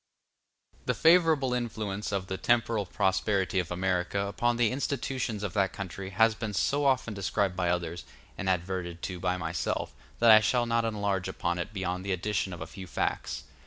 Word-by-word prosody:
The - - +2
favorable 160 -6 +4
influence 110 -5 -3
of 100 -2 -1
the 95 - -4
temporal 115 -3 +1
prosperity 95 +1 +1
of 85 -2 -2
America 90 +1 0
upon 120 +4 0
the 120 -3 +3
institutions 130 -5 -2
of 100 -4 -3
that 100 -2 +1
country 95 0 -6
has 110 +4 +4
been 105 -2 -4
so 145 +9 +1
often 130 -4 +2
described 100 -1 0
by 90 -1 0
others, 85 0 -2 0.3
and 95 -2 -2
adverted 90 -1 -2
to 90 -2 -4
by 90 0 0
myself, 90 - -2 0.2
that 115 -1 +6
I 110 - +10
shall 120 +3 +2
not 115 0 +1
enlarge 100 -4 -1
upon 85 -2 -2
it 85 - -4
beyond 95 -2 -3
the 100 -1 -1
addition 95 +1 -1
of 85 - -7
a - - -3
few 95 -2 -9
facts. 70 - -2
100 Hz, 180 wpm, -29 LUFS, 90-115 Hz, 0.3 s, I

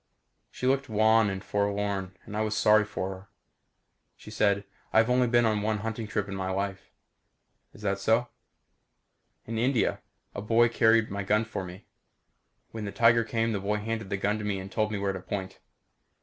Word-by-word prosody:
She - - -6
looked 135 0 +1
wan 110 0 +4
and 95 0 -5
forlorn 100 -2 -2
and 105 - -8
I 105 - 0
was 110 0 -1
sorry 105 0 +5
for 100 -3 -4
her. 95 +1 -10 0.9
She 105 - -12
said, 100 -2 +2 0.3
"I've 115 +2 +4
only 125 0 +3
been 120 0 +3
on 110 -2 +1
one 110 0 0
hunting 115 -1 -3
trip 105 -1 -2
in 100 - -6
my 95 -1 -3
life." 95 0 -3 0.8
"Is 105 - -15
that 100 -1 0
so?" 115 +4 +2 1.2
"In 115 0 -3
India. 125 0 +1 0.3
A - - -5
boy 115 +2 +3
carried 115 -2 +3
my 100 0 -3
gun 105 +3 +1
for 110 -3 -5
me. 90 +2 -10 0.9
When 110 -2 -5
the 100 - -4
tiger 115 +1 +4
came 115 0 -1
the 105 - -1
boy 105 +2 -1
handed 110 +1 -3
me - - -13
the 100 - -1
gun 105 +2 -1
and 100 -2 -3
told 110 -1 0
me 105 - -2
where 100 -1 -1
to 95 - -5
point. 95 -1 -5
105 Hz, 190 wpm, -28 LUFS, 100-115 Hz, 1.2 s, sorry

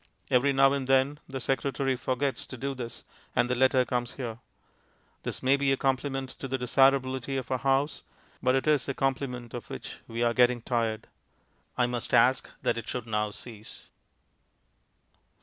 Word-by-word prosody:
Every 130 +3 +4
now 135 0 +5
and 135 -2 -2
then 135 +2 +3
the 135 0 -4
secretary 135 +1 0
forgets 130 +2 -2
to 130 - -8
do 140 +3 -2
this, 120 -3 -7 0.3
and - - +3
the 125 - 0
letter 130 0 +4
comes 120 -1 -2
here. 120 -4 -5 0.8
This - - -5
may 135 +2 +4
be 140 -1 +2
a 135 - +2
compliment 135 0 -1
to 135 - -4
the 130 0 -1
desirability 130 +1 +2
of 130 -1 -5
our 130 - +1
house, 135 +3 +1 0.4
but 130 +1 +3
it 135 - +1
is 150 -3 +2
a 135 - -2
compliment 125 -3 -2
of 120 - -7
which - - -7
we 115 +1 -2
are 120 0 +3
getting 125 -1 +3
tired. 115 -3 -1 0.7
I 125 - +4
must 120 -1 -1
ask 130 +1 +4
that - - +1
it - - -8
should 125 -3 -3
now 105 -1 0
cease. 110 0 -11
130 Hz, 175 wpm, -28 LUFS, 120-135 Hz, 0.8 s, now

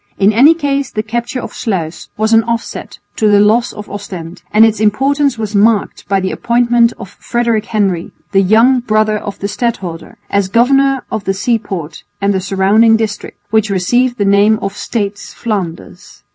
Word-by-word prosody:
In 200 +2 +3
any 280 +9 +6
case 280 -4 -1
the 215 - -3
capture 235 +3 -3
of - - -7
Sluis 175 -7 -4
was 220 +1 +1
an 225 0 +5
offset 235 0 -4 0.2
to 215 - +2
the 205 -1 +5
loss 220 +4 +3
of 210 - -9
Ostend; 185 -4 -8
and 220 +1 +6
its 220 -1 +1
importance 270 +5 +1
was 215 -1 -4
marked 210 +1 +1
by 195 -1 +2
the 190 0 -2
appointment 235 0 +2
of - - -8
Frederick 235 -3 -1
Henry, 195 -7 -1 0.2
the 195 -1 +3
young 225 +7 +4
brother 215 -2 +1
of 200 -1 -7
the 200 - -3
stadholder, 195 -7 -4
as 200 -1 0
governor 270 +5 +2
of 205 - -3
the 195 - -1
seaport 195 -8 -3 0.2
and 200 0 +1
the 190 - -1
surrounding 205 +4 +3
district, 215 -2 -4
which 220 -1 +2
received 240 +7 +1
the 205 - 0
name 200 +2 +4
of 195 0 -4
States 205 -3 -4
Flanders. 190 -7 -6
215 Hz, 175 wpm, -14 LUFS, 200-235 Hz, 0.2 s, any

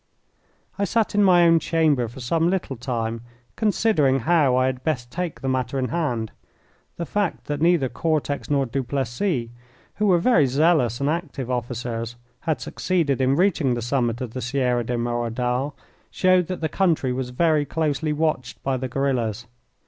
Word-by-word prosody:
I - - +1
sat 225 +2 0
in 205 0 +4
my 180 -3 +6
own 165 -1 +5
chamber 155 -7 +1
for 120 +4 -10
some 165 +7 +1
little 180 -7 -2
time 115 -2 -3 0.3
considering 200 - +2
how 145 -2 +3
I 130 0 +3
had 130 -1 -2
best 125 -6 -2
take 180 -2 -4
the 135 - -3
matter 130 0 -1
in 130 -1 -1
hand. 125 -10 -2 0.7
The 170 - -3
fact 205 0 -2
that 145 0 -3
neither 170 -5 +3
Cortex 150 0 -2
nor 140 -2 +2
Duplessis, 130 - -2 0.5
who 210 - +1
were 180 -3 +5
very 170 - +4
zealous 140 -3 +2
and 140 - +1
active 150 -6 -3
officers, 120 -1 -3 0.2
had 160 -2 -1
succeeded 160 -8 0
in 130 +1 +3
reaching 165 -7 +2
the 120 - -3
summit 120 -1 0
of 120 -3 -5
the 130 - -4
Sierra 125 -1 0
de 120 +1 -2
Merodal, 120 +3 -1 0.3
showed 185 -2 +3
that 185 -2 -5
the 160 - +1
country 160 -7 +1
was 125 0 -3
very 155 +3 +2
closely 155 +1 -1
watched 150 -5 -2
by 135 -1 0
the 130 +1 -3
guerillas. 120 -4 -1
135 Hz, 170 wpm, -23 LUFS, 125-165 Hz, 0.7 s, my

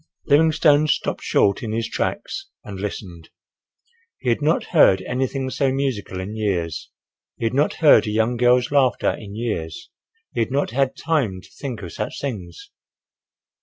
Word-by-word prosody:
Livingstone 155 0 +4
stopped - - -1
short 100 -1 +2
in 110 -2 -4
his 115 0 -1
tracks 390 0 -3 0.2
and 100 -2 -8
listened. 90 -5 -6 0.9
He 125 - -2
had 120 - +1
not 155 +3 +2
heard 95 - +5
anything 130 +2 -2
so 135 0 +1
musical 130 -9 -2
in 100 +4 -5
years—he 95 -2 -5
had 115 - 0
not 145 +3 +2
heard 145 - +7
a - - -1
young 110 +3 +1
girl's 125 +1 +3
laughter 135 -3 +3
in 100 -1 -9
years—he 115 - -6
had 115 - +1
not 140 -1 0
had 135 +2 0
time 140 - 0
to - - -18
think 125 -7 -6
of 85 - -7
such - - -4
things. 95 - -6
120 Hz, 155 wpm, -22 LUFS, 100-140 Hz, 0.9 s, heard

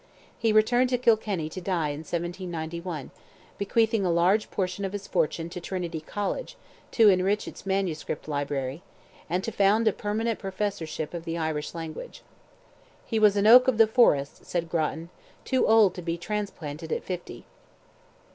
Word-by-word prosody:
He 225 - +2
returned 240 +4 +4
to 250 - +1
Kilkenny 215 -8 +1
to 185 - -7
die 175 -5 -1
in 145 0 -4
1791, 170 -1 -5 0.5
bequeathing 220 +1 +2
a 180 - +1
large 180 +5 +2
portion 185 +1 -2
of 195 0 -3
his 205 -1 -5
fortune 165 -1 -1
to 180 0 -6
Trinity 175 -3 -4
College, 210 - -4 0.4
to 225 -3 +6
enrich 195 +2 +2
its - - -10
MS. 190 -5 -1 0.2
library, 145 -1 -3 0.5
and 180 +3 0
to 225 - -3
found 210 +2 +3
a 215 - +4
permanent 220 +3 -2
professorship 185 -6 -3
of 170 -1 -5
the 165 0 -4
Irish 155 -1 -3
language. 165 -2 -7 0.8
"He 225 - -1
was 210 -1 +5
an 200 - +2
oak 250 +4 +8
of 255 -4 +2
the 225 - +7
forest," 215 - +2
said 170 -2 -2
Grattan, 165 0 -2 0.4
"too 260 -1 +2
old 220 -4 +5
to 180 - -7
be 170 0 -3
transplanted 170 -6 -5
at - - -1
fifty." 180 -2 -6
185 Hz, 160 wpm, -27 LUFS, 165-215 Hz, 0.8 s, oak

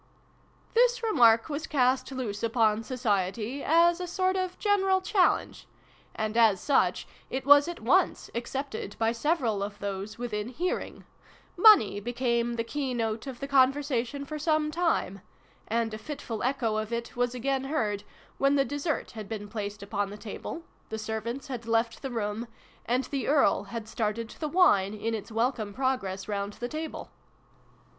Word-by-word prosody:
" - - -34
This 480 0 +3
remark 230 - +5
was 300 +1 -4
cast 260 -2 +1
loose 240 -6 -4
upon 225 -2 +2
Society, 225 +1 -1
as 335 +2 +4
a 360 - -3
sort 370 +2 0
of 370 -1 -2
general 385 -2 +2
challenge; 375 0 +1 0.5
and, 215 0 -2
as 220 -5 +5
such, 285 - +1 0.2
it 260 0 -3
was 285 +2 +7
at 345 0 -6
once - - +2
accepted 240 -3 -4
by 225 0 +2
several 235 -4 0
of 200 0 -4
those 200 +1 -5
within 220 -3 -3
hearing: 345 +9 -3 0.5
Money 365 - +7
became 235 +1 -1
the 230 - -1
key 260 +1 -3
note 225 +1 -2
of 260 -2 -7
the 275 - -4
conversation 275 -1 +2
for 305 +2 -6
some 310 0 +1
time; 320 - 0 0.5
and 225 0 0
a 215 - -5
fitful 235 -4 -6
echo 240 -4 0
of 215 +1 -3
it 235 0 -4
was 245 0 0
again 265 +2 -1
heard, 215 -8 -1 0.4
when 275 +1 +3
the 275 -1 +3
dessert 290 +2 -2
had 215 -3 -8
been 210 -2 -5
placed 205 -1 -5
upon 200 0 -2
the 205 - -8
table, 225 +9 -7 0.3
the 220 - -4
servants 220 +4 -4
had 245 -5 -6
left 230 0 0
the 270 - -4
room, 225 -1 -3 0.4
and 250 +2 +1
the 275 -1 -3
Earl 275 -9 +3
had 220 +2 -6
started 220 +1 -2
the 310 - -2
\vine 215 - +4
in 225 +2 -2
its 220 0 -5
welcome 225 -3 -1
progress 205 -8 -1
round 200 -1 -3
the 240 - -5
table. 310 +4 -6
240 Hz, 165 wpm, -28 LUFS, 215-285 Hz, 0.5 s, was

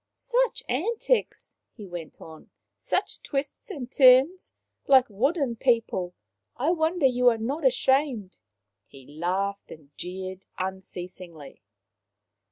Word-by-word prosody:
" - - -59
Such - - 0
antics! 440 - -1
" - - -58
he 210 - -8
went 175 -3 -8
on. 160 -1 -13 0.3
Such - - -2
twists 280 +6 -4
and 265 -10 -7
turns! 265 +7 +5 0.4
Like 265 -2 +7
wooden 255 - 0
people! 225 -8 0 0.4
I 285 +7 +1
wonder 325 -1 +1
you 250 -1 +5
are 230 - 0
not 270 +8 -3
ashamed." 260 -5 +1 0.5
He 135 -2 -15
laughed 185 +7 -3
and 150 -2 -13
jeered 185 +1 -6
unceas 185 -1 -6
ingly. 160 -6 -12
240 Hz, 125 wpm, -26 LUFS, 185-280 Hz, 0.5 s, Like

